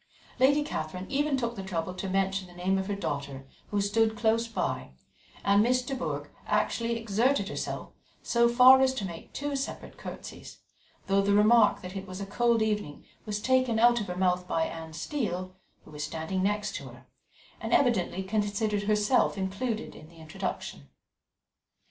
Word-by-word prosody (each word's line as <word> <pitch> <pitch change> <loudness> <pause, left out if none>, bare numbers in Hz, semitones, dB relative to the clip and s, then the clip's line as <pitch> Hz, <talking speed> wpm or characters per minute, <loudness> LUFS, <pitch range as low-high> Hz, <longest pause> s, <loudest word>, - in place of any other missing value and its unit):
Lady 285 +3 +4
Catherine 180 - -4
even 285 0 +1
took 235 -2 -2
the 195 - -5
trouble 180 -2 -3
to 190 +1 -5
mention 195 0 0
the 175 - -16
name 190 +2 0
of 190 - -3
her 205 - -1
daughter, 140 -7 -4 0.2
who 205 - -1
stood 220 +2 +2
close 230 +1 +2
by, 225 - -3 0.5
and 200 +1 +4
Miss 250 +3 +2
de 270 - -4
Bourgh 260 - -3 0.2
actually 235 0 0
exerted 225 0 +1
herself - - -4 0.3
so 235 0 +3
far 255 +2 +8
as 265 0 +3
to 210 - -3
make 170 -3 -8
two 290 0 -3
separate 275 0 -5
curtsies, - - -9 0.5
though 195 0 +3
the 200 +1 +2
remark 215 +1 +5
that 180 +1 -7
it 195 0 -5
was 185 0 -7
a 200 - -4
cold 230 +2 +2
evening 210 -9 -2 0.2
was 210 -1 -2
taken 255 -1 +2
out 240 +1 +5
of 210 - -5
her 180 0 -5
mouth 180 -1 +1
by 165 - +1
Anne 160 -1 -7
Steele, 185 - -3 0.3
who - - -14
was 150 0 -5
standing 160 +5 -3
next 210 +2 0
to - - -8
her, - - -15 0.5
and - - -5
evidently 205 -7 +2
considered 205 +1 0
herself 210 +2 +2
included 205 +4 -3
in 155 - -13
the 170 - -18
introduction. 155 - -6
205 Hz, 175 wpm, -28 LUFS, 185-235 Hz, 0.5 s, far